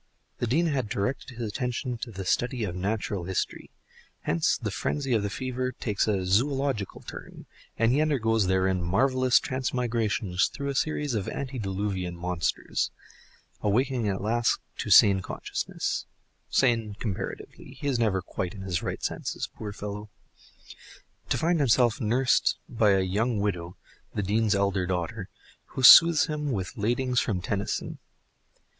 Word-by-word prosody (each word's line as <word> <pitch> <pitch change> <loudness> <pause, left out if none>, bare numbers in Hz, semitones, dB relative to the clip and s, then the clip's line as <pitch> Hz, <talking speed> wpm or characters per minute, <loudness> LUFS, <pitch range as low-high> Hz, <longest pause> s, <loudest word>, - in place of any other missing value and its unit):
The 120 - -1
Dean 155 +9 +2
had 135 -9 -1
directed 115 +4 -3
his 120 -2 -3
attention 125 +2 -2
to 120 - -5
the 95 -3 -7
study 120 +4 0
of 90 -4 -3
natural 100 -1 -2
history; 95 0 -3 0.5
hence 80 0 +1
the - - -4
frenzy 135 -3 -1
of 110 - +3
the 100 - -2
fever 130 +3 -3
takes 105 -4 -1
a 100 -3 0
zoological 130 +2 0
turn, - - -10 0.3
and 115 +1 +3
he 140 +4 +3
undergoes 115 -9 +2
therein 95 0 +1
marvellous 130 +8 +3
transmigrations 115 -7 0
through 140 0 -5
a - - -1
series 150 0 -1
of 105 -4 -2
antediluvian 100 -8 -3
monsters; 90 -1 -1 0.7
awaking 120 +2 +1
at 95 0 -2
last 115 +2 +1 0.2
to - - -3
sane 100 -2 +7
consciousness - - -3 0.4
(sane 115 -5 +2
comparatively, 100 -6 -6
he - - -7
is 135 -4 +1
never 100 -5 +1
quite 90 0 -4
in 95 - -7
his 90 -3 -2
right - - -4
senses, - - -3
poor 105 -2 -6
fellow) 105 +1 -6 1.2
to - - +1
find 165 +1 +1
himself 125 -1 +3
nursed 125 +4 +2
by 115 -4 +2
a 95 -1 +4
young 105 +5 0
widow, 90 -4 -2 0.4
the 105 - -1
dean's 105 +2 +2
elder 100 -2 +1
daughter, 90 +2 -3 0.4
who 130 - -6
soothes 165 +5 +9
him 150 -2 -3
with 95 -1 -3
ladings 125 +3 +1
from 100 -6 -1
Tennyson. 100 +2 -3
110 Hz, 150 wpm, -27 LUFS, 95-130 Hz, 1.2 s, soothes